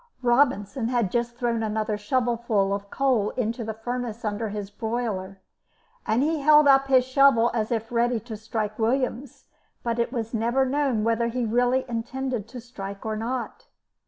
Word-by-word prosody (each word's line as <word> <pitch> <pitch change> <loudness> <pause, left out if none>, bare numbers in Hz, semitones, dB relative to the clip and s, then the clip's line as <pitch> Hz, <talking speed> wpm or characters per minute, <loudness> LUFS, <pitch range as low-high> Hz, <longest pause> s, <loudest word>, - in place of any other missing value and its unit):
Robinson 240 -2 +2
had 235 -6 0
just 240 0 -1
thrown 235 -2 -1
another 215 0 -1
shovelful 225 -2 0
of 200 0 -3
charcoal 250 -6 +1
into 235 0 -1
the 220 -1 -4
furnace 235 0 -4
under 210 +1 -2
his 205 -1 -5
boiler, 210 -4 -3 0.7
and 230 +5 +2
he 315 +1 0
held 300 +1 +6
up 275 0 +5
his 260 -2 +4
shovel 260 -3 +4
as 220 -1 -1
if 225 -1 -2
ready 240 0 +1
to 225 0 -7
strike 215 0 -4
Williams, 250 +2 -1 0.4
but 235 0 -1
it 235 - 0
was 230 -3 -4
never 235 +4 +1
known 265 -5 0
whether 230 +1 +1
he 240 +1 -2
really 245 +3 +2
intended 240 -1 -3
to 250 +2 -9
strike 200 -5 -8
or 220 0 -2
not. 235 +3 -4
235 Hz, 165 wpm, -25 LUFS, 220-255 Hz, 0.7 s, held